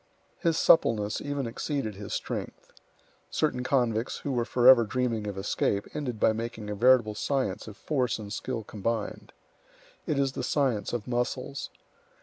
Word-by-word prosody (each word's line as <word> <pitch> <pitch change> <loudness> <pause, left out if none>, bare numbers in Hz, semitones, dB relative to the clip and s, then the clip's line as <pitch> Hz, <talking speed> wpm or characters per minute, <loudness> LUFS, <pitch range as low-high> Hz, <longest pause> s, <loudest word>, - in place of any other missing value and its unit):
His 165 -3 +1
suppleness 105 -9 +4
even 145 -2 -2
exceeded 115 0 -3
his 100 +1 -8
strength. - - -5 0.6
Certain 130 -5 0
convicts 120 -3 +1
who 140 - -4
were 120 -2 0
forever 125 0 +7
dreaming 115 -2 -1
of 100 -2 -4
escape, 100 +1 0
ended 130 -7 -3
by 110 - +4
making 110 -2 -5
a - - -3
veritable 120 -1 +4
science 130 -3 -1
of 105 -2 -9
force 130 -4 0
and 105 -2 -7
skill 120 -2 -3
combined. 110 +1 -3 0.8
It 150 - 0
is 135 -1 +2
the - - -4
science 130 -8 0
of 120 -3 -3
muscles. 125 +3 -2
120 Hz, 150 wpm, -28 LUFS, 110-130 Hz, 0.8 s, forever